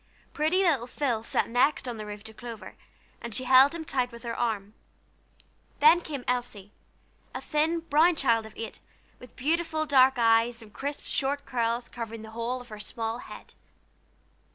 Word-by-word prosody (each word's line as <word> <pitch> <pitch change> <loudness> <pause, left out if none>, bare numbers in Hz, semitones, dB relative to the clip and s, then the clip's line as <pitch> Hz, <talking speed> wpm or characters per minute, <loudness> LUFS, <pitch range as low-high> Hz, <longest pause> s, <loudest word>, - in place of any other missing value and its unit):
Pretty 320 +6 +2
little 280 -10 +2
Phil 250 -4 -1
sat - - 0
next 255 +4 +2
on 240 -2 -4
the 215 -1 -7
roof 205 0 -8
to 220 0 -11
Clover, 230 -1 -9 0.5
and 235 -3 -6
she 255 - -2
held 265 +4 +6
him 325 -1 -6
tight 255 -4 -1
with 235 0 -12
her 230 -1 -4
arm. 215 -4 -2 1.1
Then 315 +4 +7
came 285 -7 -6
Elsie, 240 -5 -3 0.6
a - - -2
thin, 320 +3 0
brown 325 +2 +4
child 230 -6 +2
of 220 - -15
eight, 225 - -6 0.4
with 250 - -14
beautiful 315 +2 0
dark 265 -2 +5
eyes, 230 0 +3
and 210 -2 -16
crisp, 285 +1 -4
short 280 +1 -1
curls 235 0 -1
covering 230 -2 -7
the 220 - -10
whole 235 +3 -3
of 245 - -14
her 215 -1 -9
small 225 +2 -4
head. - - -11
245 Hz, 175 wpm, -28 LUFS, 230-285 Hz, 1.1 s, Then